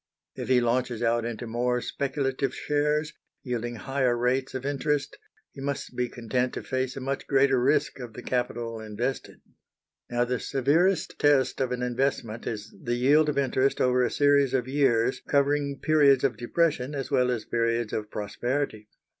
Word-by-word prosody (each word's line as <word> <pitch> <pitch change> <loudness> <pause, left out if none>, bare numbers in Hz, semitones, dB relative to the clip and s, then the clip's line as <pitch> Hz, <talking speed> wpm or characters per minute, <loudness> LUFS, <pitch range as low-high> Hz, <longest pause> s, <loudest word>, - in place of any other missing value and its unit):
If - - -6
he 130 -1 +5
launches 120 0 0
out 115 0 +1
into 120 0 -4
more 125 +2 0
speculative 135 0 -2
shares, 150 +1 0 0.3
yielding 120 -2 -3
higher 130 0 0
rates 130 +2 0
of 130 0 -4
interest, 145 0 -1 0.4
he 135 - -10
must 140 -2 -4
be 125 0 -1
content 125 +2 -2
to - - -5
face 130 0 -2
a - - -2
much 135 +1 -3
greater 135 -2 +3
risk 135 +1 +1
of 120 -3 -8
the 125 - -9
capital 120 -2 -2
invested. 110 +5 -4 0.7
Now, 120 0 +1
the 125 0 -2
severest 165 +7 +1
test 135 -3 +3
of 130 -1 0
an 125 0 -2
investment 125 -3 -2
is 105 -1 -5
the 120 0 -1
yield 145 +5 +4
of 150 - -2
interest 135 0 +1
over 125 0 +3
a - - +1
series 140 -2 +3
of 125 -1 0
years 130 -3 +2
covering 140 0 +1
periods 145 -4 +4
of 135 -3 +2
depression 145 +1 0
as 135 -2 -4
well 125 0 +3
as 120 -3 -2
periods 115 -1 0
of 105 -1 -3
prosperity. 110 +2 -3
130 Hz, 170 wpm, -27 LUFS, 120-140 Hz, 0.7 s, he